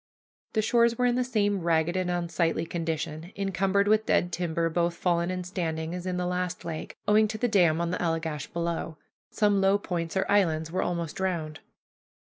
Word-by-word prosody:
The 215 - +1
shores 235 +1 +3
were 250 - +2
in 245 - +3
the 250 +1 +1
same 205 -5 +1
ragged 165 +1 +1
and 185 -1 0
unsightly 170 -1 0
condition, 165 0 -4
encumbered 195 0 +1
with 215 +1 +3
dead 175 - +2
timber, 165 -1 -1
both 170 +1 0
fallen 170 0 +1
and 185 -1 -3
standing, 165 -3 -3
as 180 0 -5
in 180 -1 -1
the 180 - -1
last 180 0 -2
lake, 160 -2 -6
owing 215 +1 +5
to 215 +1 -4
the 245 - +1
dam 175 -7 +3
on 170 0 -1
the 180 - -2
Allegash 160 -3 -2
below. 170 -1 -3 0.3
Some 205 -2 +2
low 195 +1 +4
points 175 -3 -3
or 190 - +2
islands 160 -6 +2
were 185 - 0
almost 170 -3 -3
drowned. 170 -5 -2
175 Hz, 190 wpm, -27 LUFS, 165-195 Hz, 0.3 s, owing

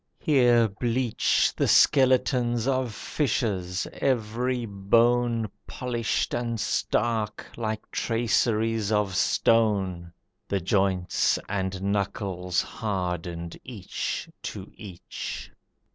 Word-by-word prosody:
Here 120 -6 +4
bleach 120 +3 +1
The - - +1
skeletons 125 -3 +4
of 130 -3 0
fishes, 100 - -1
every 125 0 -1
bone 115 +3 +2 0.2
Polished 120 -3 -2
and 120 -1 -2
stark, 110 -1 -1
like 110 -2 -4
traceries 115 -2 +1
of 105 -3 +1
stone, 95 -8 +2 0.4
The 100 - 0
joints 95 0 +1
and 95 -1 -2
knuckles 95 -2 -1
hardened 90 -5 -4
each 110 -7 -4
to - - -7
each. 95 -5 -7
110 Hz, 85 wpm, -26 LUFS, 95-120 Hz, 0.4 s, Here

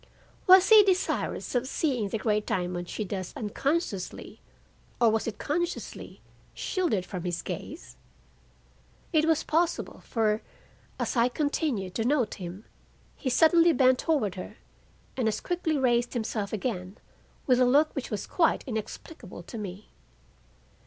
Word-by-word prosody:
Was 375 0 +8
he 435 -1 +10
desirous 380 -2 0
of 250 0 0
seeing 255 -8 -1
the 225 - -1
great 210 -1 0
diamond 180 -1 -2
she 215 - -3
thus 190 -2 -5
unconsciously 270 - -3 0.6
(or 235 -2 +5
was 225 +1 0
it 225 - -4
consciously) 345 +4 -4 0.3
shielded 315 - -1
from 180 -2 -6
his 175 -2 -3
gaze? 60 - -7 1.2
It 310 -1 +4
was 320 -2 +2
possible, 340 +2 0
for, 220 -1 0 0.6
as - - -1
I 235 +1 +4
continued 260 - -1
to 225 - -1
note 255 -1 +1
him, 180 +4 -7 0.5
he 265 - -3
suddenly 330 +5 +5
bent 255 -1 +4
toward 275 - +1
her 185 - -8 0.6
and 250 -4 0
as 215 -1 0
quickly 345 -3 -1
raised 245 -2 +1
himself 215 -3 -2
again 200 -3 -3 0.5
with 250 -2 +4
a 255 - +5
look 290 +5 +4
which 275 - -4
was 210 -3 -3
quite 335 -3 +1
inexplicable 220 - -7
to 230 - -8
me. 200 0 -7
240 Hz, 140 wpm, -28 LUFS, 205-310 Hz, 1.2 s, he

